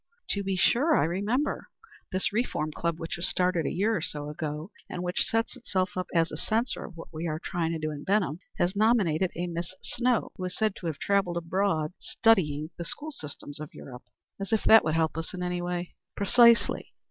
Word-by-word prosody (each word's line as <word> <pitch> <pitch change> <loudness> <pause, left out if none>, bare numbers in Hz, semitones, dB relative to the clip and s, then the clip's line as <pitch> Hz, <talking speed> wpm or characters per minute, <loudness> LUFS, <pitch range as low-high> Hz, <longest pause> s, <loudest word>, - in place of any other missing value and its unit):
"To 200 - 0
be 195 -1 -1
sure. 275 - +4
I - - +4
remember. 205 - 0 0.4
This 185 +1 0
Reform 210 -9 0
Club, 165 +1 -2
which 165 +1 -4
was 175 +1 0
started 180 -4 +1
a - - -1
year 215 +4 +1
or 175 - -1
so 150 -1 -4
ago, 150 +3 -4 0.2
and 180 - -4
which 180 0 0
sets 225 +3 0
itself 205 -5 -1
up 185 -1 -2
as 165 -1 +2
a - - -5
censor 230 +3 0
of 175 - -11
what 165 - -10
we 160 +2 -3
are 155 -1 -1
trying 165 0 -2
to - - -1
do 155 0 -2
in 145 -1 -7
Benham, 185 -6 +1 0.2
has 180 +3 +1
nominated 200 -6 +3
a 175 - -2
Miss 170 +1 -4
Snow, 245 -2 +1
who 185 - -3
is 180 - -5
said 215 -2 +1
to 175 - -5
have 155 -3 -2
travelled 195 0 +1
abroad 170 -2 0
studying 160 -9 +2
the - - -2
school 295 - -5
systems 145 - -7
of 155 -1 -8
Europe." 125 -2 -10 0.3
"As 195 +2 -4
if 220 - +2
that 225 - +8
would 155 0 0
help 160 0 +1
us 165 - -5
in 180 - -4
any 180 0 -1
way." 175 0 -3 0.2
"Precisely. 235 +3 +4
180 Hz, 215 wpm, -28 LUFS, 160-205 Hz, 0.4 s, that